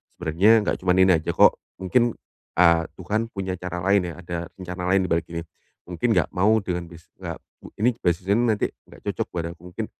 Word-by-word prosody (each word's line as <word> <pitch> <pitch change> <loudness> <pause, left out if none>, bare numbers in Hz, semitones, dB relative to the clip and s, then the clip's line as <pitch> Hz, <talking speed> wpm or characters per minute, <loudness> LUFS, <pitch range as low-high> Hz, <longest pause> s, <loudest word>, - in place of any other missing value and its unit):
Sebenernya 85 +6 +3
nggak - - -1
cuman 90 0 +2
ini 95 - +5
aja 80 - -3
kok. - - +5 0.2
Mungkin, 120 +5 +2 0.4
eee, 85 -1 +5
Tuhan 105 +5 -2
punya 95 -2 -3
cara 90 -1 -5
lain 100 -2 +3
ya, - - -9
ada 85 0 -4 0.2
rencana 90 -1 -6
lain 95 0 +4
di - - -9
balik 85 0 +1
ini. 85 0 -4 0.5
Mungkin 110 +6 0
nggak 90 - +1
mau 105 +5 +4
dengan 90 -2 -3
bis 85 -1 -15
nggak - - -5 0.3
mu - - -10
ini 120 +4 +4
beasiswanya 90 +4 +1
nih 120 - +2
nanti 105 - 0 0.2
nggak - - -16
cocok - - -3
buat 85 -1 -2
aku, 85 - -24
mungkin. 110 +4 -4
90 Hz, 210 wpm, -24 LUFS, 85-100 Hz, 0.5 s, ini